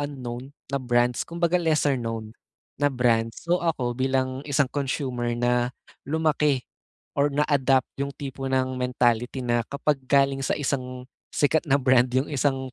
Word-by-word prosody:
unknown 130 -3 -5 0.2
na 140 - +2
brands 120 -1 +1
kumbaga, 170 +1 0
lesser-known 120 -9 0 0.5
na 145 - +4
brand. 120 -4 +2
So, 175 +1 0
ako 135 -8 0
bilang 130 +1 0
isang 140 0 +3
consumer 130 -4 -2
na 120 0 +2 0.4
lumaki 150 -3 +1 0.5
or 140 +1 +2
na-adapt 140 -2 +2 0.2
'yong 140 0 -2
tipo 135 -1 -5
ng 130 0 +1
mentality 125 0 +1
na 120 -1 +2
kapag 140 0 0
galing 140 -1 +3
sa 135 - 0
isang 130 -3 -3 0.3
sikat 155 +2 +2
na 140 - +5
brand 130 -2 +4
'yong 130 +3 0
isang 130 -2 0
130 Hz, 140 wpm, -25 LUFS, 125-145 Hz, 0.5 s, na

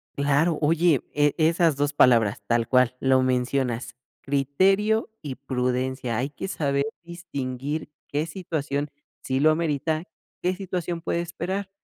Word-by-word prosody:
Claro. 145 +4 +2
Oye, 160 -2 +3
eh, 145 -1 +3
esas 165 -1 +3
2 145 +1 0
palabras, 115 -7 +4
tal 115 -1 +1
cual, 125 -1 +3
lo 130 -1 +3
mencionas, 125 -2 0 0.3
criterio 195 - +2
y 135 -4 -5
prudencia. 125 -2 -2
Hay 130 +4 -1
que 170 - -6
saber 140 -5 0 0.2
distinguir 145 -4 -5 0.2
qué 150 +2 -1
situación 150 -5 -3 0.3
sí 130 0 -1
lo 155 +2 +5
amerita, 155 0 -1 0.4
qué 180 +1 0
situación 180 -3 -4
puede 170 +1 -1
esperar, 190 +4 -4
145 Hz, 130 wpm, -25 LUFS, 130-170 Hz, 0.4 s, lo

